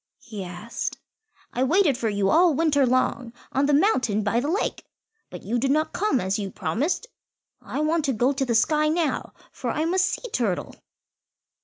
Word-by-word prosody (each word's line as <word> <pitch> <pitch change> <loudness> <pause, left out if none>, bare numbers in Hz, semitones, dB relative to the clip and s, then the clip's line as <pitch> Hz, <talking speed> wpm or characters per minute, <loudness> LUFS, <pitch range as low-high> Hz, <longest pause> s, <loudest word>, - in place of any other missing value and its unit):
he 215 -5 -8
asked; 180 +6 -5 0.6
"I 250 - 0
waited 315 0 +3
for 235 -3 -1
you 200 -2 +1
all 335 -1 +5
winter 290 -3 +3
long 250 -1 0 0.2
on 275 +1 +1
the 295 - +2
mountain 255 - +2
by 215 +3 +1
the 270 - -2
lake, 390 +6 -1 0.5
but - - -9
you 240 +2 -1
did 270 +3 0
not 310 +3 +1
come 370 -10 +1
as 190 +2 -1
you 200 -2 -3
promised. 265 - -2 0.6
I - - -4
want 310 0 +1
to 270 - +1
go 245 +5 +2
to 270 0 -1
the 240 -3 0
sky 305 +6 +3
now, 320 -1 -1 0.2
for - - -5
I 310 - -1
must 375 +3 +2
see 375 +7 -3
Turtle." 215 -8 -1
270 Hz, 185 wpm, -24 LUFS, 225-315 Hz, 0.6 s, all